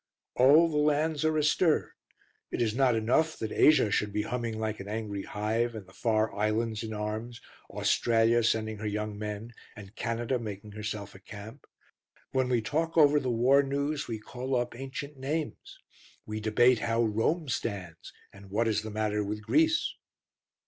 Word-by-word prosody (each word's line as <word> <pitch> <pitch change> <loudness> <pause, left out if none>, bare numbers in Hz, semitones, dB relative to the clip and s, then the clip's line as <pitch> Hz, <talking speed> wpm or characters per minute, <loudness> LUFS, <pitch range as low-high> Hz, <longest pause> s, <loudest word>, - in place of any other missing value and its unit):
All 145 +7 +6
the 155 -2 -2
lands 150 +1 +1
are 155 0 +2
astir. 155 +2 +2 0.6
It - - -4
is 115 -3 +1
not 125 -1 +3
enough 125 +9 +1
that 110 -1 -4
Asia 150 -9 +5
should 105 0 0
be 105 +1 -1
humming 115 -1 -3
like 110 -1 -2
an 95 - -7
angry 105 -2 -4
hive 110 +4 -1
and 105 -3 -7
the 95 - -18
far 110 -1 0
islands 110 +1 0
in 110 -1 -5
arms, 110 +2 -4 0.3
Australia 115 0 +2
sending 110 -1 0
her 110 - -3
young 105 0 -3
men 105 +2 -6 0.2
and 105 +1 -12
Canada 120 +2 -1
making 105 -2 -7
herself 105 -1 -5
a 95 - -13
camp. 105 +6 -11 0.6
When 130 -1 +1
we 120 -3 +1
talk 160 +9 -1
over 150 -1 +6
the 130 - -2
war 125 +4 +4
news, 140 +2 -2
we 115 - -3
call 125 +4 -4
up 120 -1 -1
ancient 135 +3 -7
names: 150 +4 -4 0.5
we 110 0 -4
debate 120 +3 +4
how 115 0 +1
Rome 115 +9 0
stands 95 -9 -4 0.2
and 100 0 -14
what 110 +4 +1
is 105 -1 +1
the 110 - -6
matter 105 0 -1
with 105 +1 -4
Greece. 325 - +2
115 Hz, 170 wpm, -29 LUFS, 105-135 Hz, 0.6 s, All